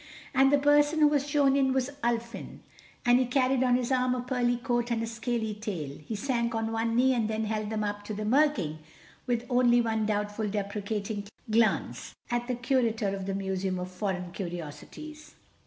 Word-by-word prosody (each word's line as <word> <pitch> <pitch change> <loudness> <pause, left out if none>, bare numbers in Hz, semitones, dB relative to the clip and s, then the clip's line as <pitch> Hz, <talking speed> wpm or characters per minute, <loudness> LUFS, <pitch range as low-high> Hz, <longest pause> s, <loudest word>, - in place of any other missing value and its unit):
And 270 +1 +5
the 285 - +6
person 290 +2 +4
who 300 - +8
was 290 -1 +1
shown 280 -2 +3
in 265 -1 +3
was 265 +1 0
Ulfin, 235 0 -3 0.4
and 245 +1 +6
he 255 - +1
carried 255 0 +2
on 250 -1 +4
his 250 0 -1
arm 255 -1 +2
a 250 - -2
pearly 245 -1 +1
coat 240 -1 -1
and 230 -1 0
a - - 0
scaly 230 -1 -2
tail. 180 -10 -5
He 220 - -4
sank 235 0 -1
on 225 0 -1
one 225 0 0
knee 260 +2 +4
and 225 -3 0
held 215 -1 -2
them 215 -1 -1
up 205 0 -3
to 215 - -4
the 210 +1 -3
Mer 285 +7 +5
King, 160 - -4 0.5
with 240 -1 0
only 245 -1 +4
one 220 -2 0
doubtful 210 0 -1
deprecating 205 0 -3 0.2
glance 225 0 +1 0.2
at 240 0 -1
the 250 - -1
Curator 235 -4 +1
of 195 -1 -4
the 195 - -1
Museum 190 -1 -2
of 180 0 -5
Foreign 180 -2 -3
Curiosities. 175 - -8
230 Hz, 190 wpm, -28 LUFS, 205-255 Hz, 0.5 s, who